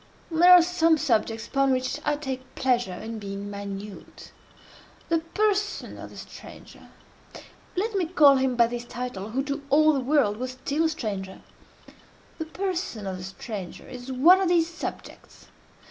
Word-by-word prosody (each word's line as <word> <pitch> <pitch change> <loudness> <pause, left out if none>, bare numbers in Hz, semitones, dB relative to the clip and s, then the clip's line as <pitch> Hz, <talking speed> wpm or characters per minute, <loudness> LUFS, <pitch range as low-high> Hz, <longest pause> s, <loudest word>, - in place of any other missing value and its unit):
There 345 +3 +6
are 360 -1 +9
some 330 -2 +3
subjects 225 -6 0
upon 275 -1 +2
which 255 +2 -1
I 295 -1 +1
take 265 -3 -6
pleasure 245 -7 0
in 220 +3 -6
being 200 0 -6
minute. 200 0 -8 0.8
The 330 -1 +3
person 410 +4 -1
of - - -8
the - - -14
stranger—let 430 +5 -9
me 375 -4 0
call 295 -5 +6
him 260 -1 +1
by 235 -1 +5
this 240 +1 -4
title, 240 -5 -6
who 265 +5 -1
to 280 +1 -3
all 310 +2 +5
the 275 - 0
world 260 -6 +2
was 255 +1 -4
still 280 +5 -1
a - - +3
stranger—the 210 - -9
person 345 - -4
of 190 -1 -4
the 180 - -8
stranger 190 0 -7
is 250 +1 -8
one 335 +9 +6
of 375 - +1
these 335 -2 +3
subjects. 340 - -9
265 Hz, 155 wpm, -26 LUFS, 220-325 Hz, 0.8 s, are